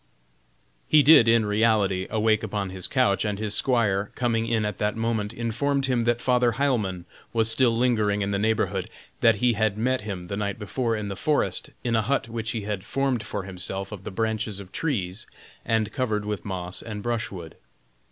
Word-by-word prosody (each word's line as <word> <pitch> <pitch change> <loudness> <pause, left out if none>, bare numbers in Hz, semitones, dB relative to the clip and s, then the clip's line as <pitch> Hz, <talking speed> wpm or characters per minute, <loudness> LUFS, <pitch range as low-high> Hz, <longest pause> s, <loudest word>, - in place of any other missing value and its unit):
He 150 -1 +6
did, 145 -5 +8
in 115 -1 +4
reality, 105 -3 +2
awake 110 0 +2
upon 100 -3 -3
his 95 -1 -2
couch, 125 -7 +2
and 105 -2 -1
his 105 0 -2
squire 105 -6 +2
coming 115 -2 0
in 115 -2 +1
at 105 -3 -4
that 105 0 0
moment 110 -2 -1
informed 120 +5 -1
him 125 -3 +1
that 120 0 +1
Father 125 -2 +3
Heilmann 110 -11 0 0.3
was 115 -1 +2
still 125 +2 +4
lingering 110 -4 +2
in 100 - -2
the 100 - 0
neighborhood; 100 -3 0 0.3
that 115 -3 +5
he 120 +4 +2
had 110 -1 0
met 130 +3 0
him 100 -4 -5
the 100 - -4
night 105 +2 -2
before 115 +2 -1
in 105 -1 -4
the 100 - -4
forest, 150 +9 0
in 120 -2 0
a 110 - +3
hut 135 +3 0
which 115 -1 -4
he 115 -1 -2
had 100 -2 -4
formed 135 0 0
for 105 -2 -4
himself 95 +1 -5
of 100 -3 -8
the - - -5
branches 110 0 -2
of 95 -2 -11
trees, 105 - -2 0.4
and 110 -1 0
covered 110 -6 -1
with 105 -3 -4
moss 90 -2 -5
and 105 -3 -6
brushwood. 110 -9 -4
110 Hz, 190 wpm, -25 LUFS, 100-120 Hz, 0.4 s, did